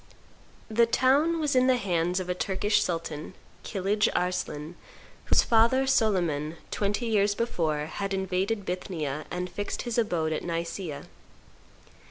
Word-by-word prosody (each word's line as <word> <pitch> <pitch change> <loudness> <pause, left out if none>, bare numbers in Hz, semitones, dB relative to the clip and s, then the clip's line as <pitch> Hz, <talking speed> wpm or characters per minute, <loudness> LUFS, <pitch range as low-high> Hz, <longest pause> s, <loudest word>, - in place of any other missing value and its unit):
The 230 +1 +3
town 280 +8 +3
was 295 -3 0
in 255 0 +5
the 255 -1 +4
hands 180 -3 0
of 185 - -4
a 180 - 0
Turkish 205 +3 +1
sultan, 165 -2 -3 0.3
Kilidge 205 +1 +1
Arslan, 175 -3 -2 0.5
whose - - +4
father, 235 +4 +4
Soliman, 175 - +1 0.2
twenty 205 +4 -1
years 205 -2 +2
before, 160 -10 -1
had 195 +5 -4
invaded 190 +2 -1
Bithynia 160 -5 -3
and 180 0 -3
fixed 205 +3 -4
his 240 -1 -1
abode 170 -8 0
at - - -3
Nicrea. 170 -2 -4
190 Hz, 135 wpm, -27 LUFS, 170-225 Hz, 0.5 s, in